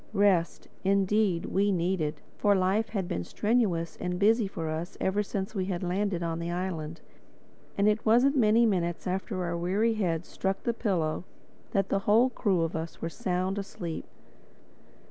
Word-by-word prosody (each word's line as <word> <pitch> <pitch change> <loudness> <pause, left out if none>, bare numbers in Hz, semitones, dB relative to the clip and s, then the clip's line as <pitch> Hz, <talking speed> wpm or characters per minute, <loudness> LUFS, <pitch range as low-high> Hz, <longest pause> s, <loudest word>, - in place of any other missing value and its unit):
Rest, 195 -5 +2 0.2
indeed, 195 -1 +2
we 200 +1 +1
needed; 175 -4 -1
for 205 -1 +3
life 195 +4 +1
had 195 -5 -2
been 90 - -2
strenuous 205 - 0
and 180 0 -2
busy 215 +2 +3
for 165 -4 -5
us 160 +4 -4
ever 190 +2 +1
since 200 0 -4
we 190 -4 -1
had 185 -1 -3
landed 180 0 -1
on 165 0 -2
the 170 0 -3
island. 175 -3 -4 0.8
And 200 +1 +3
it 215 +1 +2
wasn't 245 +6 +4
many 230 -2 +5
minutes 175 -5 0
after 185 0 -2
our 170 -1 -2
weary 195 +7 +1
heads 175 -6 -1
struck 190 0 -2
the 235 - 0
pillows 180 -8 -1 0.5
that 195 -1 +1
the 195 - +2
whole 235 +5 +5
crew 195 -7 +1
of 165 - -2
us 160 +1 -5
were 165 - -3
sound 185 0 -1
asleep. 175 -4 -5
190 Hz, 165 wpm, -28 LUFS, 170-210 Hz, 0.8 s, many